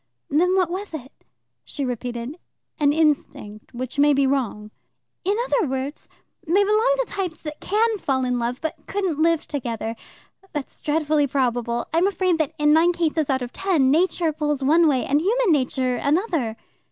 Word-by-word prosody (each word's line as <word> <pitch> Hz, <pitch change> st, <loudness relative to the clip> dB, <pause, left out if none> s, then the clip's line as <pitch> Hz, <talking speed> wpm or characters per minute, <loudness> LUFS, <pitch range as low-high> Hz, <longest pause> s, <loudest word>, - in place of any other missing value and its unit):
"Then 360 Hz, +6 st, +3 dB
what 365 Hz, -3 st, +2 dB
was 380 Hz, -2 st, -5 dB
it?" 265 Hz, -3 st, -8 dB, 0.5 s
She 280 Hz, -, -4 dB
repeated: 245 Hz, +4 st, -5 dB, 0.4 s
"An 290 Hz, -1 st, +4 dB
instinct 290 Hz, -9 st, -1 dB
which 255 Hz, +3 st, -5 dB
may 290 Hz, 0 st, +5 dB
be 275 Hz, 0 st, +3 dB
wrong." 235 Hz, -6 st, -1 dB, 0.5 s
"In 400 Hz, +3 st, +1 dB
other 465 Hz, -8 st, +1 dB
words, 265 Hz, +2 st, -4 dB, 0.3 s
they 380 Hz, +6 st, +3 dB
belong 435 Hz, +5 st, +3 dB
to -, -, +1 dB
types 370 Hz, -5 st, -4 dB
that 300 Hz, -1 st, -6 dB
can 440 Hz, +1 st, +1 dB
fall 260 Hz, -5 st, 0 dB
in 250 Hz, -1 st, 0 dB
love, 240 Hz, +2 st, -2 dB
but 320 Hz, -, -5 dB
couldn't 375 Hz, -6 st, -1 dB
live 330 Hz, -1 st, +2 dB
together. 230 Hz, -5 st, -4 dB, 0.6 s
That's 295 Hz, -3 st, -5 dB
dreadfully 300 Hz, -1 st, +1 dB
probable. 240 Hz, -3 st, -1 dB
I'm 340 Hz, +4 st, +3 dB
afraid 370 Hz, -3 st, +1 dB
that 310 Hz, -3 st, -1 dB
in 295 Hz, 0 st, +4 dB
nine 335 Hz, +3 st, +4 dB
cases 320 Hz, -3 st, 0 dB
out 260 Hz, -2 st, +1 dB
of 245 Hz, -, -6 dB
ten 320 Hz, -9 st, +2 dB
Nature 330 Hz, 0 st, +2 dB
pulls 295 Hz, -2 st, -1 dB
one 320 Hz, +4 st, +5 dB
way 265 Hz, -4 st, +1 dB
and 290 Hz, +2 st, +2 dB
human 445 Hz, +3 st, +2 dB
nature 255 Hz, -3 st, +1 dB
another." 290 Hz, -, 0 dB
300 Hz, 170 wpm, -23 LUFS, 260-350 Hz, 0.6 s, may